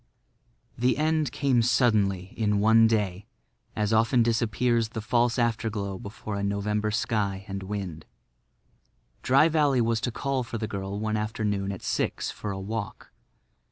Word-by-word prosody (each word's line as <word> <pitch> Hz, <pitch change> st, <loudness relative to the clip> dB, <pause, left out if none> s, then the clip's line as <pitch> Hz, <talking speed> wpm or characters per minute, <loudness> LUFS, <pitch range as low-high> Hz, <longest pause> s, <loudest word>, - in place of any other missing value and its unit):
The 125 Hz, +2 st, +2 dB
end 155 Hz, -2 st, +1 dB
came 140 Hz, -4 st, +2 dB
suddenly 105 Hz, -6 st, +2 dB
in 105 Hz, -2 st, +1 dB
one 110 Hz, +2 st, +6 dB
day, 105 Hz, -4 st, -1 dB, 0.5 s
as 105 Hz, 0 st, 0 dB
often 115 Hz, +2 st, +4 dB
disappears 115 Hz, 0 st, +1 dB
the 110 Hz, -, -5 dB
false 120 Hz, +2 st, +1 dB
afterglow 110 Hz, -5 st, -1 dB
before 105 Hz, +1 st, -7 dB
a 100 Hz, -, -3 dB
November 105 Hz, +1 st, -1 dB
sky 105 Hz, -3 st, -1 dB
and 100 Hz, -1 st, -5 dB
wind. 95 Hz, -5 st, -5 dB, 1.1 s
Dry 135 Hz, +5 st, +5 dB
Valley 150 Hz, -5 st, +2 dB
was 115 Hz, -1 st, +1 dB
to 125 Hz, -, -1 dB
call 135 Hz, +2 st, -1 dB
for 120 Hz, -1 st, -5 dB
the 110 Hz, 0 st, -3 dB
girl 100 Hz, 0 st, -4 dB
one 110 Hz, 0 st, -1 dB
afternoon 105 Hz, -2 st, -2 dB
at 95 Hz, -, -8 dB
six -, -, -1 dB
for 105 Hz, -, -6 dB
a 95 Hz, -1 st, -4 dB
walk. 105 Hz, +1 st, -5 dB
110 Hz, 150 wpm, -27 LUFS, 100-120 Hz, 1.1 s, one